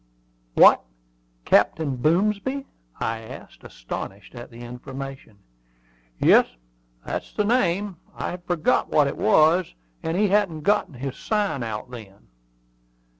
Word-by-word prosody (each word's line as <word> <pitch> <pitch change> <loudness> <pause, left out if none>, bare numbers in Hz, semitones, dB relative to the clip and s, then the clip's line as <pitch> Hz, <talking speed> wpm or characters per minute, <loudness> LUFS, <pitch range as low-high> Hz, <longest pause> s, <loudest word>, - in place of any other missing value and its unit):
"What, - - +7 0.6
Captain 150 -5 +2
Boomsby?" 205 - 0 0.3
I 115 0 -2
asked, 110 - -12
astonished 95 +11 -8
at 120 -1 -9
the 115 0 -12
information. 130 -1 -8 0.8
"Yes, - - +5 0.6
that's - - -5
the 210 - 0
name. 200 -4 +1 0.2
I - - -4
had 175 0 -8
forgotten 175 -3 0
what 150 - +6
it 140 - -2
was; 180 -3 +3 0.3
and 165 +2 -2
he 205 0 +3
hadn't 190 -6 +1
got 200 -3 +1
his 135 +2 -5
sign 205 - -1
out 110 +1 -5
then." 105 -5 -12
155 Hz, 125 wpm, -24 LUFS, 125-200 Hz, 0.8 s, What